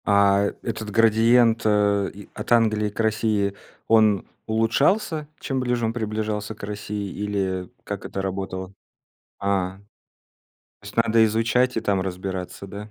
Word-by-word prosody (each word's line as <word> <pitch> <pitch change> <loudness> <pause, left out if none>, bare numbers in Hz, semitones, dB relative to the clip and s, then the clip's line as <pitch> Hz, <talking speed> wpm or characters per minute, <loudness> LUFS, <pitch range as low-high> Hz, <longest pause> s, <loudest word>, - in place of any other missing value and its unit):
А, 100 0 +4
этот 110 -2 -4
градиент, 115 +2 +4
э, 100 -2 +2
и 100 +1 -12
от - - -7
Англии 110 -3 +3
к 105 - -13
России, 110 -2 +1 0.3
он 110 -3 +4 0.2
улучшался, 145 - +1
чем 135 -2 -2
ближе 125 -2 0
он 110 - -1
приближался 110 -1 -3
к - - -15
России? 105 -1 -4
Или 95 -3 -2
как - - -6
это 95 - -4
работало? 95 0 -4 0.7
А. 95 -2 -1 1.0
То - - -14
есть - - -10
надо 115 0 +4
изучать 115 +3 +1
и - - +1
там 100 -3 +1
разбираться, 95 0 -5
да? 105 +2 -8
105 Hz, 140 wpm, -24 LUFS, 100-115 Hz, 1.0 s, А